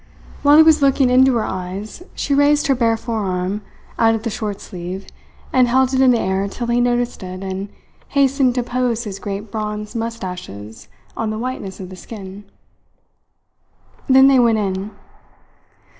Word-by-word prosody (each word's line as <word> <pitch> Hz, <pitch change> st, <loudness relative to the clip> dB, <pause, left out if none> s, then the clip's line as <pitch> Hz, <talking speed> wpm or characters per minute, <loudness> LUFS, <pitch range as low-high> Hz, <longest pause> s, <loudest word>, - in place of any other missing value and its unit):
While 290 Hz, +1 st, +6 dB
he 315 Hz, -, +9 dB
was 315 Hz, -2 st, +5 dB
looking 270 Hz, -2 st, +3 dB
into 260 Hz, 0 st, +5 dB
her 225 Hz, -, +1 dB
eyes 190 Hz, -, -6 dB
she 280 Hz, -, -1 dB
raised 290 Hz, +1 st, +3 dB
her 275 Hz, -, +3 dB
bare 230 Hz, -3 st, +1 dB
forearm, 200 Hz, -4 st, -2 dB, 0.4 s
out 225 Hz, 0 st, +4 dB
of 220 Hz, -, -5 dB
the 230 Hz, -, -2 dB
short 210 Hz, -3 st, -4 dB
sleeve, 180 Hz, +2 st, -7 dB, 0.5 s
and 255 Hz, -1 st, +4 dB
held 260 Hz, +2 st, +2 dB
it 260 Hz, -, +3 dB
in 260 Hz, -, +6 dB
the 245 Hz, -, +4 dB
air 190 Hz, 0 st, 0 dB
till 240 Hz, +4 st, -5 dB
he 235 Hz, +1 st, +1 dB
noticed 245 Hz, 0 st, 0 dB
it 185 Hz, 0 st, -7 dB
and 190 Hz, +1 st, -4 dB, 0.4 s
hastened 270 Hz, -2 st, +2 dB
to 250 Hz, -, 0 dB
pose 245 Hz, -1 st, -1 dB
his 200 Hz, -3 st, -6 dB
great 200 Hz, +1 st, -6 dB
bronze 210 Hz, 0 st, -4 dB
moustaches 180 Hz, -, -6 dB, 0.3 s
on 225 Hz, -, -2 dB
the 215 Hz, -, -3 dB
whiteness 230 Hz, -5 st, -5 dB
of 185 Hz, -2 st, -7 dB
the 185 Hz, -, -9 dB
skin. 200 Hz, 0 st, -10 dB, 1.6 s
Then 265 Hz, +1 st, +7 dB
they 270 Hz, -2 st, +5 dB
went 230 Hz, -2 st, +4 dB
in. 195 Hz, -1 st, -2 dB
225 Hz, 170 wpm, -19 LUFS, 195-255 Hz, 1.6 s, he